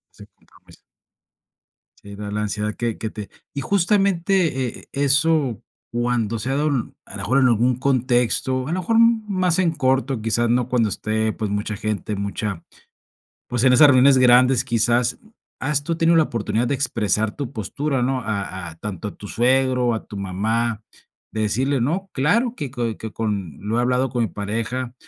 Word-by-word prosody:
Ese - - -13
compromiso. - - -22 1.2
Sí, 100 0 -10
da 105 0 -6
la 105 +1 -2
ansiedad 105 +1 -2
que 115 -2 -2
que 110 - -4
te 105 -2 -8 0.3
Y 140 - -2
justamente, 185 - +1
e - - -18
eso 140 - +1 0.3
cuando 120 -2 -1
se 120 +5 -3
ha - - 0
dado, 150 +1 +1 0.4
a - - -13
lo 100 - -7
mejor, 120 +8 +1
en 130 - +4
algún 120 +1 +2
contexto, 130 0 +1
a - - -3
lo 180 - -1
mejor 225 +6 +1
más 210 -7 +2
en 180 -3 +2
corto, 130 -4 0
quizás 115 +2 +1
no 120 0 +1
cuando 120 -4 +2
esté, 110 +1 -1
pues, 110 -2 -3
mucha 105 +1 -2
gente, 105 0 -3
mucha 100 -2 -4 0.9
pues, 120 -2 -1
en 130 - +6
esas 150 +4 +8
reuniones 130 0 +6
grandes 125 0 +5
quizás, 120 0 +1 0.4
¿has 145 0 0
tú 165 - -1
tenido 165 0 +3
la 160 - +5
oportunidad 115 -1 -1
de 140 - 0
expresar 110 -5 0
tu 140 -3 -5
postura, 135 - -2
no? 130 +1 0
A 100 -5 -4
a - - -12
tanto 105 +1 -5
a - - -10
tu 100 - -10
suegro, 125 0 +2
a 110 - -5
tu 105 - -9
mamá, 110 +4 -1 0.5
de 110 - -2
decirle: 130 +6 0
"No, 180 +10 -1
claro 230 - +1
que 145 -4 -5
co 120 -4 -2
que 110 -1 -7
con 100 -9 -3
lo 110 +3 -2
he - - +3
hablado 125 +1 +1
con 120 0 -1
mi 115 - 0
pareja, 115 +6 -4
120 Hz, 180 wpm, -22 LUFS, 110-140 Hz, 1.2 s, esas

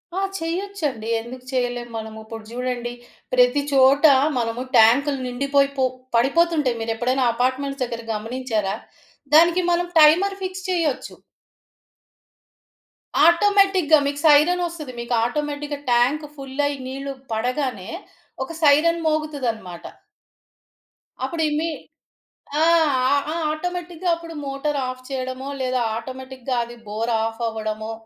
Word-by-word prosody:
ఆ! - - 0 0.2
చెయ్యొచ్చండి. 330 - -3
ఎందుకు 250 +2 -10
చేయలేము 245 -1 -2
మనము? 220 0 -7
ఇప్పుడు 225 0 -8
జూడండి. 245 0 -3 0.4
ప్రతి 250 +3 +4
చోట 275 +2 +5 0.3
మనము 230 +1 -2 0.2
ట్యాంక్‌లు 270 +6 +5
నిండిపోయి 275 +2 +1
పొ 260 - +3 0.3
పడిపోతుంటాయి. 285 0 +2
మీరెప్పుడైనా 240 +4 0
అపార్ట్మెంట్స్ 260 +3 -1
దగ్గర 235 -1 -4
గమనించారా? 220 -2 -2 0.6
దానికి 340 +3 +6
మనం 345 0 +1
టైమర్ 355 +6 +5
ఫిక్స్ 370 0 -5
చేయొచ్చు. 330 -7 -1 2.1
ఆటోమేటిక్‌గా 380 -2 +4
మీకు 285 0 -3
సైరన్ 320 +5 +5
ఒస్తది. 305 -6 -8
మీకు 235 +1 -3
ఆటోమేటిక్‌గా 290 +2 -3
ట్యాంక్ 255 +6 +2
ఫుల్ 270 -1 -9
అయ్యి 285 -1 -4
నీళ్ళు 275 +1 -5 0.2
పడగానే 250 -2 -2 0.6
ఒక - - -10
సైరన్ 310 +4 +5
మోగుతదనమాట. 260 - -2 1.4
అప్పుడు 325 +5 -2
ఇమీ 310 +3 0 0.9
ఆ! - - +5 0.5
ఆహ్, 285 0 +2
ఆ! - - -3 0.2
ఆటోమేటిక్‌గా 355 +2 -4
అప్పుడు 335 -1 -10
మోటర్ 275 +2 -2
ఆఫ్ 255 0 -6
చేయడమో 260 0 -4
లేదా 255 -1 0 0.2
ఆటోమేటిక్‌గా 260 +1 -5
అది 240 +1 -11
బోర్ 225 +3 -2
ఆఫ్ 225 +1 -3
అవ్వడమో... 220 0 -4
270 Hz, 115 wpm, -22 LUFS, 240-310 Hz, 2.1 s, దానికి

